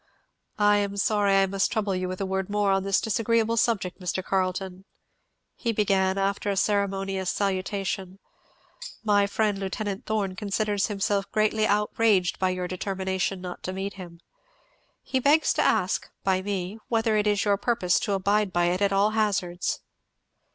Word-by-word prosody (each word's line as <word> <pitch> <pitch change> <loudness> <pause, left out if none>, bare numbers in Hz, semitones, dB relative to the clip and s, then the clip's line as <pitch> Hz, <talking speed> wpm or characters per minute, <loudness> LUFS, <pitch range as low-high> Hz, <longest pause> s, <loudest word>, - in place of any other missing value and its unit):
"I 205 0 +4
am 200 0 -1
sorry 205 -2 +2
I 195 - +5
must 195 0 0
trouble 210 -4 0
you 185 0 -2
with 185 0 -5
a 195 - -1
word 190 0 -2
more 205 -1 +1
on 195 0 +2
this 195 0 +1
disagreeable 230 +1 +1
subject, 210 -6 0
Mr. 185 0 -3
Carleton," 185 0 -2 0.7
he 235 - -1
began, 195 -3 +1
after 195 +1 -1
a 200 - -1
ceremonious 195 -2 0
salutation, 190 -1 -2 0.9
"My 205 -2 +3
friend, 205 -1 0
Lieut. 195 -1 -3 0.3
Thorn, 205 -4 -1
considers 205 0 -1
himself 200 -1 -1
greatly 215 0 +2
outraged 210 -2 +2
by 185 - +2
your 180 -1 -2
determination 190 0 -2
not 180 -1 -7
to 185 - -4
meet 195 +1 -4
him. 175 -3 -11 0.8
He 265 - -1
begs 290 +5 +4
to - - +1
ask, - - +1
by 190 -1 +1
me, 195 +1 -4
whether 225 -1 +1
it 210 0 +2
is 205 -1 +1
your 200 -1 +3
purpose 200 -5 +1
to 205 - -1
abide 200 +1 +1
by 175 0 +2
it 180 +2 -2
at 200 -1 +3
all 200 +2 +3
hazards?" 200 -5 -1
195 Hz, 165 wpm, -26 LUFS, 190-210 Hz, 0.9 s, I